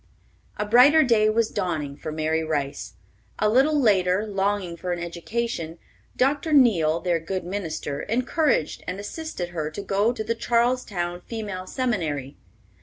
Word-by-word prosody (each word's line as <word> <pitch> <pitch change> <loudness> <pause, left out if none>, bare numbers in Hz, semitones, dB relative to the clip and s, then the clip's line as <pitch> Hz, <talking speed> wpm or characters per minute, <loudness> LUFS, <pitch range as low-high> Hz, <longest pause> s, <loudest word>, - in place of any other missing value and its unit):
A 210 - -1
brighter 255 +9 +6
day 220 -4 +3
was 225 0 +1
dawning 160 -8 -2
for 155 - -6
Mary 160 +1 0
Rice. 145 -8 -3 0.4
A 210 - +2
little 270 +7 +3
later, 195 -4 +3
longing 195 -3 -1
for 180 +2 -4
an 175 - -1
education, 170 0 -4 0.4
Dr. 285 +4 +1
Neale, 175 - +4
their 175 -2 +1
good 185 +3 -4
minister, 165 -6 -4
encouraged 250 - 0
and 185 +2 -4
assisted 205 - -5
her 155 -3 -3
to 180 +6 -7
go 200 +4 +1
to 230 -3 -4
the 230 +2 -1
Charlestown 230 -7 0
Female 205 -5 -5
Seminary. 160 - -2
195 Hz, 145 wpm, -24 LUFS, 170-235 Hz, 0.4 s, brighter